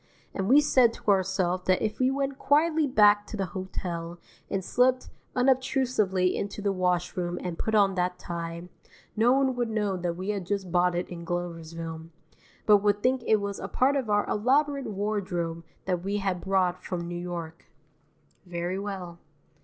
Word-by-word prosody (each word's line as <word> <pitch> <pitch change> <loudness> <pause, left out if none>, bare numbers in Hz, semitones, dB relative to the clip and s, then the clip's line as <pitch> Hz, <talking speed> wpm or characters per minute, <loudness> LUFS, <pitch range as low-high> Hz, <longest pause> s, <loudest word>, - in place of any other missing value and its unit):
And 195 +1 -2
we 285 +4 +7
said 255 -5 +4
to 210 - 0
ourself 185 -2 +1
that 185 0 +3
if 215 -1 -2
we 255 0 +3
went 275 0 -2
quietly 305 +2 +3
back 205 -4 +5
to 215 - -6
the 195 - -1
hotel 175 -3 -5 0.3
and 190 -2 -2
slipped 255 +1 +2 0.3
unobtrusively 250 -8 +2
into 200 +1 -4
the 200 -1 0
washroom 180 -1 -1
and 175 -2 -5
put 220 - 0
on 200 -2 +4
that 180 -1 -1
tie, 170 0 -6 0.5
no 225 +3 +4
one 265 -1 +2
would 240 -2 -1
know 210 -3 -1
that 175 -1 -2
we 185 +3 -5
had 200 -4 -2
just 195 -3 -2
bought 180 0 +3
it 175 - -2
in 170 -1 -7
Gloversville, 165 -1 -5 0.6
but 210 -1 +7
would 205 0 +1
think 255 0 +2
it 220 - +5
was 200 -1 -4
a 195 - -5
part 265 +7 +2
of 260 -6 -1
our 205 0 +2
elaborate 275 +5 +1
wardrobe 190 -5 -2 0.2
that 180 -2 -1
we 200 +3 -2
had 190 -3 -1
brought 185 -2 0
from 170 -2 -4
New 175 - -5
York. 170 -2 -6 0.8
Very 175 +2 -3
well. 190 -4 -6
195 Hz, 175 wpm, -27 LUFS, 175-220 Hz, 0.8 s, we